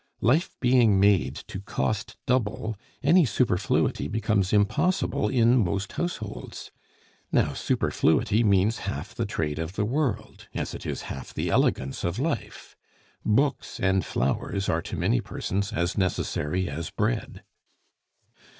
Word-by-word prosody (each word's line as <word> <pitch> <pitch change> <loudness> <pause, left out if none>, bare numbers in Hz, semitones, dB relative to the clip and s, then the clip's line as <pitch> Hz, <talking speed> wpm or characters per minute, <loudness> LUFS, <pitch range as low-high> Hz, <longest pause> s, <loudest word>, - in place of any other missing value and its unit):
Life 150 +10 +2
being 120 -5 +4
made 95 -10 +3
to 95 - -7
cost 105 +1 -2
double, 115 -3 0 0.3
any 170 +5 +6
superfluity 100 - +1
becomes 105 -3 0
impossible 110 - +2
in 120 0 +4
most 100 +2 -2
households. 110 - -5 0.6
Now - - +2
superfluity 110 +3 +1
means 100 +1 +3
half - - -5
the - - -2
trade 75 -1 -2
of 80 +2 -4
the 105 +1 0
world, 120 -4 -2
as - - -3
it - - -7
is - - -3
half 65 - -7
the - - -1
elegance 65 +1 +1
of 85 +3 -1
life. 135 - -3 0.5
Books 135 +6 +1
and 95 0 +2
flowers 95 +9 -1
are 80 - +1
to - - -6
many - - +2
persons 100 +1 -3
as 85 +1 -1
necessary 90 -1 -1
as 80 +3 -4
bread. - - -2
100 Hz, 130 wpm, -26 LUFS, 90-120 Hz, 0.6 s, any